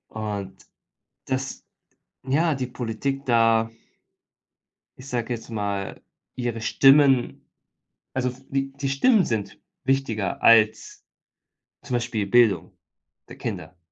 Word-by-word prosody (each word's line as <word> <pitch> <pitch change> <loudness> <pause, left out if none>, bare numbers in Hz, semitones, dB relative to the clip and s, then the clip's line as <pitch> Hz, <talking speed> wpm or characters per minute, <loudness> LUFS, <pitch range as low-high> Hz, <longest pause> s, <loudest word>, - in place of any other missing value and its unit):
Und 105 -3 -6 0.6
dass 135 0 -4 0.6
ja, 155 +5 +2
die 130 -2 -3
Politik 125 +3 -4
da 115 -2 +3 1.3
ich 130 - -12
sage 120 -1 -2
jetzt 115 0 -8
mal 100 -3 -4 0.3
ihre 120 -2 -3
Stimmen 135 +1 +4 0.7
also, 125 -1 -1 0.2
die 135 0 -1
die 140 0 -3
Stimmen 200 - +4
sind 105 -4 -3 0.2
wichtiger 125 -7 -1
als 110 -2 +3 0.8
zum 125 - -5
Beispiel 115 -3 -1
Bildung 105 -5 +3 0.5
der - - -11
Kinder. 90 - -6
120 Hz, 105 wpm, -24 LUFS, 110-135 Hz, 1.3 s, Stimmen